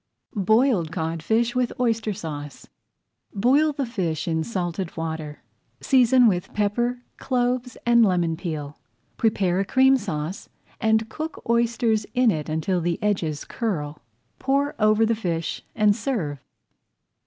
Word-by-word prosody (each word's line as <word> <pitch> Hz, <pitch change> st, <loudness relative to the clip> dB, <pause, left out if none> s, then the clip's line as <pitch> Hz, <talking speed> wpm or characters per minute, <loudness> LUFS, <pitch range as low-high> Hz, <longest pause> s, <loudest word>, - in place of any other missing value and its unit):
BOILED 215 Hz, -, +2 dB
CODFISH 165 Hz, +8 st, 0 dB
WITH 250 Hz, -1 st, +1 dB
OYSTER 225 Hz, -3 st, +1 dB
SAUCE 145 Hz, -6 st, -7 dB, 0.7 s
Boil 270 Hz, +9 st, +3 dB
the 280 Hz, -2 st, -2 dB
fish 180 Hz, -10 st, -2 dB
in 160 Hz, -1 st, 0 dB
salted 180 Hz, -4 st, -4 dB
water, 160 Hz, -2 st, -5 dB, 0.4 s
seasoned 255 Hz, -1 st, +5 dB
with 180 Hz, -4 st, 0 dB
pepper, 240 Hz, +4 st, 0 dB
cloves, 250 Hz, -1 st, -1 dB
and 235 Hz, 0 st, +5 dB
lemon 175 Hz, -5 st, +2 dB
peel. 155 Hz, -4 st, -5 dB, 0.4 s
Prepare 195 Hz, -5 st, +1 dB
a -, -, +2 dB
Cream 265 Hz, +5 st, +5 dB
Sauce, 180 Hz, -5 st, -5 dB, 0.3 s
and 220 Hz, -1 st, +2 dB
cook 310 Hz, +7 st, -6 dB
oysters 235 Hz, -2 st, +1 dB
in 250 Hz, -2 st, +4 dB
it 155 Hz, -3 st, -3 dB
until 160 Hz, +4 st, 0 dB
the 170 Hz, 0 st, -1 dB
edges 165 Hz, -8 st, -1 dB
curl, 150 Hz, -10 st, -3 dB, 0.4 s
pour 280 Hz, +2 st, +1 dB
over 215 Hz, +1 st, +4 dB
the 230 Hz, -, +2 dB
fish, 170 Hz, -7 st, -3 dB
and 210 Hz, -2 st, +4 dB
serve. 200 Hz, -, -3 dB
210 Hz, 130 wpm, -24 LUFS, 165-240 Hz, 0.7 s, seasoned